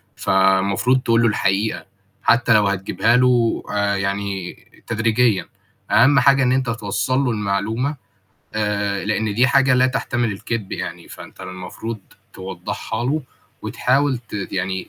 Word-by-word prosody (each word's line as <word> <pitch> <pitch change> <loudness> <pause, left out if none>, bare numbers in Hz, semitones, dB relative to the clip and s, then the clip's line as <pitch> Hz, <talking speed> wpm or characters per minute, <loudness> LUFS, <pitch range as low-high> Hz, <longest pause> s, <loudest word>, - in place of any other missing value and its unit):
فالمفروض 95 +6 +2
تقول 115 -1 +2
له 115 - +4
الحقيقة، 105 0 0 0.4
حتّى 120 0 +4
لو 105 -2 +4
هتجيبها 100 +5 +1
له 125 -2 +2
آآ 100 -1 +1
يعني 100 -2 -3 0.3
تدريجيًا، 115 -2 +1 0.4
أهَم 140 +4 +5
حاجة 135 -1 +4
إن 125 - +2
أنت 130 -1 +1
توصَّل 115 +3 -1
له 135 -3 +1
المعلومة، 110 +7 -1 0.6
آآ 105 -2 -1
لإن 110 0 -1
دي 125 +3 +4
حاجة 130 0 +4
لا 125 +1 +4
تحتمل 120 -3 -1
الكدب 105 +1 -5
يعني، 85 -1 -6
فأنت - - -12
المفروض 95 +5 -7 0.3
توضَّحها 95 +4 -5
له 150 +5 0 0.4
وتحاول 135 +1 +1
ت 115 -2 -22 0.2
يعني 95 0 -3
110 Hz, 135 wpm, -20 LUFS, 100-125 Hz, 0.6 s, أهَم